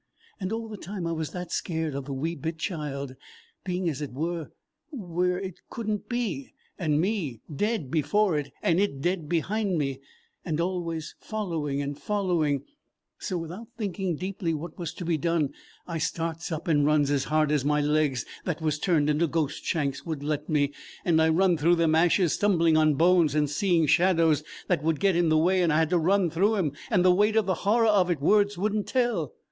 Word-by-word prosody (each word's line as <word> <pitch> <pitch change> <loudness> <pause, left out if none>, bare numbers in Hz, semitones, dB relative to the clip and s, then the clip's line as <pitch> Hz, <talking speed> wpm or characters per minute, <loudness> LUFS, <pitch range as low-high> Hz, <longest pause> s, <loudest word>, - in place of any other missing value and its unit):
And 185 -1 -3
all 225 0 -3
the 215 -1 -7
time 190 -1 -6
I 165 - -1
was 160 -2 -3
that 180 -1 -6
scared 160 -3 -2
of 140 -1 -4
the 140 - -6
wee 155 +5 -2
bit 160 +1 -4
child, 140 -6 -4 0.5
being 180 -1 -2
as 150 -3 -2
it 145 - -4
were 160 +3 -3 0.4
where 180 - -1
it 190 -3 -6
could 230 -3 -6
n't 210 -2 -2
be, 245 +2 -3 0.2
and 155 -4 +1
me 165 - -1
dead 205 - -1
before 165 +5 +2
it 145 -2 -3
and 170 +1 +3
it 200 -9 0
dead 170 0 -1
behind 190 +3 0
me, 135 -3 -2 0.4
and 160 -2 -2
always 170 -3 -2
following 160 -10 -3
and 140 0 -5
following; 170 -9 0 0.6
so 185 - -3
without 175 +7 -7
thinking 195 -5 -2
deeply 185 -1 -3
what 155 +2 -7
was 170 -3 -4
to 180 - -6
be 165 -2 0
done, 160 -3 0 0.3
I 165 -2 -4
starts 165 +1 -3
up 160 +1 -4
and 150 -3 +3
runs 145 -1 +3
as 140 -2 +1
hard 155 0 +2
as 150 -3 +2
my 150 +1 +2
legs 145 -5 +1 0.2
that 175 -3 -2
was 155 -2 -1
turned 155 -4 +2
into 150 +3 +2
ghost 155 -2 -2
shanks 140 -4 -1
would 155 -4 -4
let 150 +1 -2
me. 145 -2 +1 0.3
And 160 -2 +4
I 160 - +4
run 175 +1 +3
through 165 +3 +4
them 165 -2 +2
ashes, 170 +1 +3
stumbling 170 -6 +3
on 155 -1 +4
bones 165 -2 +4
and 150 -1 +2
seeing 165 +3 +2
shadows 165 -2 +3 0.2
that - - +1
would 160 -1 0
get 195 -3 +3
in 170 -1 +3
the 155 - +4
way 180 +4 +3
and 170 -2 +3
I 150 - +3
had 160 +1 +2
to 175 - +3
run 180 +1 +2
through 200 +7 +2
'em, 175 -8 0 0.2
and 180 - +3
the 180 - +7
weight 210 +3 +3
of 220 -2 +3
the 190 - +1
horror 220 +6 +2
of 200 -5 +4
it 170 -4 0
words 205 +6 +3
would 205 +3 0
n't 210 - -1
tell. 235 - 0
165 Hz, 205 wpm, -27 LUFS, 150-185 Hz, 0.6 s, the